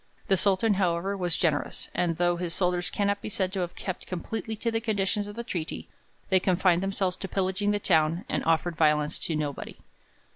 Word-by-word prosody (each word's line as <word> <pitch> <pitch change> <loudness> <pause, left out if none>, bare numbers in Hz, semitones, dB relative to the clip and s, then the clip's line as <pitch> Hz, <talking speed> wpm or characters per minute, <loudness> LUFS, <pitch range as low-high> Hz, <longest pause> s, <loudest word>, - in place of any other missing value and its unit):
The 195 - +5
Sultan, 200 +3 +3
however, 190 0 0
was 180 -4 0
generous, 155 -4 0
and 170 -2 0
though 175 0 +2
his 170 -1 -2
soldiers 180 -1 +1
cannot 200 0 0
be - - -5
said 190 -2 -1
to 195 - -1
have 175 -1 -3
kept 185 -2 -5
completely 220 +5 -4
to 230 +2 -1
the 225 0 0
conditions 205 -2 0
of 205 - -8
the 235 - -4
treaty, 175 -9 -4 0.4
they 190 -1 +5
confined 180 -1 +3
themselves 195 -1 0
to 195 - -5
pillaging 190 +2 0
the 205 - +2
town, 165 -3 +2
and - - -1
offered 165 +1 +1
violence 150 -1 +2
to 160 - -2
nobody. 145 -2 -4
185 Hz, 195 wpm, -27 LUFS, 170-200 Hz, 0.4 s, The